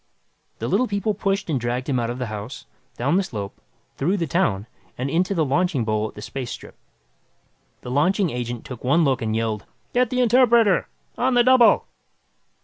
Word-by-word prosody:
The - - -4
Little 255 - +2
People 200 +1 -1
pushed 195 0 -1
and 150 -6 0
dragged 120 +2 -2
him 130 -4 +1
out 115 -1 -1
of 120 - -4
the 125 - -3
house, 110 +2 -7 0.3
down 140 +9 +1
the - - +3
slope, 100 - -7 0.4
through 190 +4 +1
the 170 - -1
town 135 - 0 0.3
and 130 +2 -2
into 180 +5 +1
the 160 -3 +2
launching 145 -3 +1
bowl 110 0 0
at - - -13
the 105 - -8
space 130 +1 -5
strip. - - -8 1.1
The 125 - -7
launching 180 +6 +2
agent 120 -1 -4
took 125 -2 -9
one 145 +7 +3
look 135 -4 +1
and 110 -1 -1
yelled, 110 -2 -2 0.3
"Get 250 -1 +2
the 255 0 0
interpreter! 235 -4 +4 0.3
On 250 +1 +2
the 240 - +6
double!" 255 -1 +5
145 Hz, 190 wpm, -23 LUFS, 120-200 Hz, 1.1 s, the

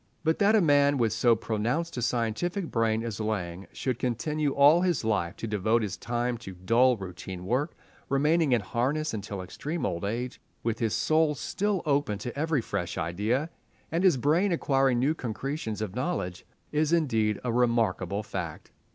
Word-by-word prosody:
But 160 0 +1
that 210 +1 +5
a 215 - +5
man 145 -3 +4
with 115 -5 +1
so 120 +3 +4
pronounced 115 +9 -2
a 125 - -3
scientific 125 - -1
brain 115 -1 +1
as 115 -3 -4
Laing 95 -4 -3
should 130 -3 -3
continue 145 +5 -1
all 145 +5 +6
his 175 -9 +1
life 100 -6 0
to - - -6
devote 110 +2 +1
his 100 -3 -3
time 120 0 -2
to 95 -5 -9
dull 115 +7 +3
routine 90 -1 -7
work, 130 - 0 0.3
remaining 150 +2 +3
in 120 -3 +3
harness 130 +10 -1
until 100 -2 -5
extreme 150 - -4
old 85 - -2
age, 120 +5 -3 0.2
with 115 -1 -1
his 115 -3 0
soul 155 -1 +2
still 200 +6 -1
open 140 -8 +1
to 120 +4 -6
every 150 -1 +1
fresh 90 -5 -3
idea 105 - -1 0.4
and 165 +3 0
his 180 -8 +5
brain 160 - +2
acquiring 135 -6 +2
new 135 +6 +2
concretions 120 -4 -4
of 100 -3 -5
knowledge, 125 - -3 0.2
is 155 +1 +1
indeed 115 -11 +2
a 120 -2 -1
remarkable 110 -5 +1
fact. 85 -6 -6
120 Hz, 170 wpm, -28 LUFS, 105-150 Hz, 0.4 s, all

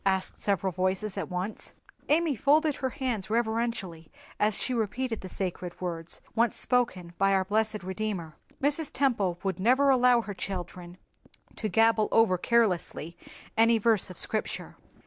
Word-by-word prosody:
asked 190 -1 -1
several 195 -2 0
voices 185 +3 -1
at - - -4
once. 185 +4 -3 0.4
Amy 310 -1 +3
folded 300 +4 +3
her 260 - -1
hands 235 -7 -3
reverentially 220 -7 -2 0.3
as 210 0 +2
she 255 - -2
repeated 230 +1 -2
the 185 - -7
sacred 180 -1 -4
words 170 -2 -5
once 230 0 +2
spoken 190 -9 0
by 195 0 +4
our 190 -1 +2
blessed 215 0 0
Redeemer. 190 -4 -4 0.2
Mrs. 295 +2 0
Temple 210 -11 +1
would 190 -2 -2
never 260 +7 +4
allow 250 -2 +5
her 210 -2 -6
children 180 -2 -6 0.6
to 215 - -3
gabble 225 +2 +4
over 205 -6 +4
carelessly 180 -7 +1 0.4
any 230 +1 +5
verse 220 -3 +2
of 185 - -9
Scripture. 215 - -2
215 Hz, 145 wpm, -28 LUFS, 185-235 Hz, 0.6 s, allow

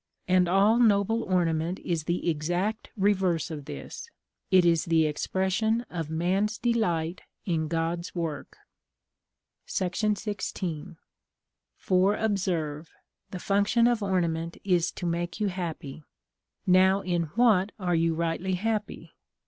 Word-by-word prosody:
And 185 -1 +4
all 200 +6 +4
noble 225 0 +3
ornament 175 -2 0
is 165 -3 -2
the 175 +1 -2
exact 175 +8 -1
reverse 190 -5 +1
of 145 -3 -6
this. 150 - -8 0.4
It 185 -2 +5
is 165 -2 +3
the 165 -1 +3
expression 190 +8 0
of 165 -4 -4
man's 190 +6 0
delight 180 -8 0 0.2
in 160 -4 0
God's 165 +2 -2
work. 165 -4 -4 1.1
§ 205 +3 -1
XVI. 175 -3 -5 0.8
For 190 +2 +2
observe, 175 -8 -1 0.4
the 185 - -6
function 205 +5 +2
of 240 -2 +2
ornament 170 -4 -1
is 180 -3 +2
to 180 - -6
make 175 +2 -2
you 210 -2 +1
happy. 165 -6 -5 0.6
Now 190 +1 +4
in 175 -3 -1
what 215 -5 +4
are 180 -3 -1
you 165 -1 +2
rightly 170 +3 -1
happy? 215 +2 -3
180 Hz, 125 wpm, -27 LUFS, 165-200 Hz, 1.1 s, It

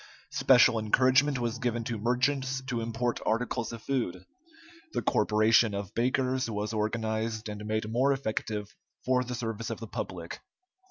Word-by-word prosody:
Special 115 - +5
encouragement 130 +6 +3
was 120 0 -2
given 120 -2 -1
to 115 -1 -3
merchants 130 +3 0
to 125 -3 -3
import 115 +1 -1
articles 120 +1 -1
of 115 -1 -8
food. 95 -9 -2 0.7
The - - -1
corporation 110 0 +3
of 100 -1 -5
bakers 130 +1 0
was 105 0 -3
organized, 110 +1 -2
and 105 0 -6
made 110 0 -1
more 125 +5 +2
effective 110 -5 -3 0.3
for 125 0 +2
the 125 0 -5
service 115 -2 -4
of 115 - -4
the 115 - -6
public. 90 -5 -6
115 Hz, 150 wpm, -29 LUFS, 110-125 Hz, 0.7 s, Special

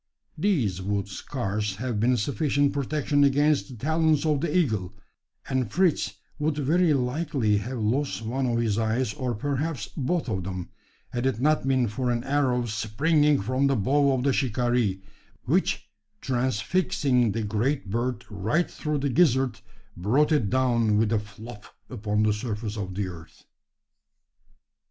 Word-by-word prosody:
These 120 - 0
would 100 +1 -1
scarce 105 -1 -3
have 120 0 -3
been 125 +3 +3
sufficient 140 +3 +1
protection 145 +1 +1
against 145 +2 +3
the 130 - -10
talons 160 +5 +1
of 150 -1 +1
an - - 0
eagle; 110 - 0 0.5
and 130 -5 -1
Fritz 165 - +1 0.2
would 150 0 0
very 160 +4 +2
likely 130 -4 0
have 120 +6 -4
lost 120 +3 -1
one 130 +4 -1
of 120 -1 0
his 115 -2 0
eyes, 110 +1 0
or 125 -3 -3
perhaps 145 +5 -2
both 160 +3 -1
of 95 -6 -2
them, 90 -1 -5 0.4
had 120 +2 -1
it 130 -4 -1
not 150 0 +2
been 130 -2 +2
for 125 +4 -2
an 120 -1 0
arrow 135 -3 +1
springing 145 +7 +2
from 130 +5 +1
the 135 - +2
bow 140 +6 +2
of 125 -1 -1
the 140 -1 +2
shikaree; 120 -6 0 0.4
which, - - 0 0.3
transfixing 130 - +1
the 115 - -2
great 110 +2 -1
bird 120 +1 -2
right 110 - -1
through 150 -1 -2
the 140 0 -1
gizzard, 130 -5 +2 0.4
brought 125 - +2
it 125 -10 +2
down 120 -4 +2
with 110 0 +2
a 110 - +2
"flop" 105 +2 -11 0.3
upon 105 -3 0
the 110 -1 +3
surface 105 -1 -4
of 95 -3 -5
the 100 -1 -1
earth. 85 -2 -12
125 Hz, 155 wpm, -26 LUFS, 105-145 Hz, 0.5 s, been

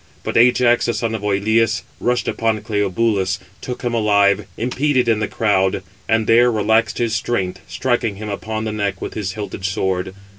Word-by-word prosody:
But - - -4
Ajax, 120 0 +4
the 120 - 0
son 115 -1 -2
of 110 - -3
Oïleus, 105 +3 +1 0.2
rushing 125 0 0
upon 110 -2 -1
Cleobulus, 105 -2 0 0.2
took 125 0 -6
him 120 -1 -1
alive, 100 -3 +3
impeded 125 +2 +1
in 115 -2 +2
the 105 - -1
crowd; 95 -3 +1 0.3
and 110 0 +2
there 120 +2 +5
relaxed 110 0 +1
his 115 -2 0
strength, 100 -4 -2
striking 120 -4 -1
him 105 +2 -7
upon 110 +2 -4
the 110 - -2
neck 100 -3 -2
with - - -5
his 95 -3 -3
hilted 105 -2 -6
sword. 95 -1 -1
110 Hz, 175 wpm, -19 LUFS, 100-115 Hz, 0.3 s, there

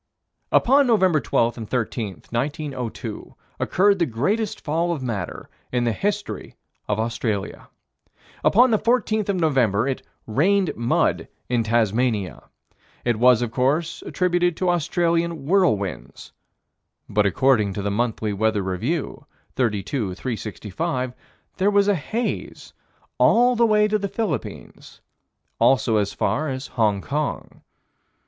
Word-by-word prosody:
Upon 275 +2 +4
Nov. 185 -9 +3
12 115 +1 +1
and 110 - -7
13, 115 -6 -3
1902, 130 -1 -4 0.2
occurred 200 +1 +2
the 170 - +2
greatest 195 - -1
fall 165 +3 -1
of 155 -6 -3
matter 105 - -4 0.2
in 125 -1 0
the 120 - +1
history 205 - -3 0.3
of 105 +1 -1
Australia. 110 -3 -3 0.7
Upon 245 +3 +5
the 215 - +3
14th 220 -3 +1
of 200 - +2
November, 130 - +2
it 135 - -2 0.2
"rained 180 - +1
mud," 120 +1 0 0.2
in 120 -1 +2
Tasmania. 110 -3 0 0.6
It 120 -3 +1
was 125 -1 +5
of 115 - -3
course 145 +7 0
attributed 175 -2 0
to 185 -1 +1
Australian 170 -2 0
whirlwinds, 110 - 0 0.8
but, 105 0 +2
according 110 -1 +2
to 100 - -4
the 100 - -1
Monthly 110 -1 -1
Weather 105 0 0
Review, 115 - -3 0.3
32 105 -3 -1
365, 125 - -4 0.4
there 190 +2 +3
was 200 -1 +3
a 205 - +4
haze 220 +8 -4 0.5
all 245 +2 +5
the 235 0 +4
way 210 -1 +4
to 215 0 0
the 200 - -2
Philippines, 190 - -5 0.6
also 130 -4 +3
as 100 -1 0
far 145 +9 -1
as 130 0 -4
Hong 105 -4 0
Kong. 150 +5 -4
130 Hz, 125 wpm, -23 LUFS, 110-180 Hz, 0.8 s, Upon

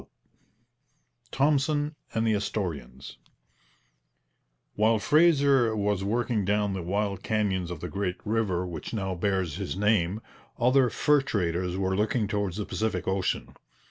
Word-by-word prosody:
CHAPTER - - -25 1.2
VII - - -6
THOMPSON 145 +1 +2 0.2
AND 110 0 +1
THE 110 - +3
ASTORIANS 80 - -4 1.6
While 110 +2 +3
Fraser 140 -3 +4
was 105 -2 0
working 115 +1 0
down 105 +1 +1
the 95 - -3
wild 100 +2 -2
canyons 95 -5 -1
of 85 -3 -6
the 90 - -4
great 95 -1 -2
river 105 -5 0
which 85 +4 -6
now 95 -3 -2
bears 95 -3 -1
his - - -4
name, 105 -2 +2 0.4
other 125 +1 +4
fur 150 +3 +3
traders 90 -8 -1
were 95 -1 0
looking 105 +2 0
towards 100 -3 -2
the 105 - -3
Pacific 110 0 -2
ocean. 95 -1 -1
105 Hz, 140 wpm, -27 LUFS, 95-115 Hz, 1.6 s, Fraser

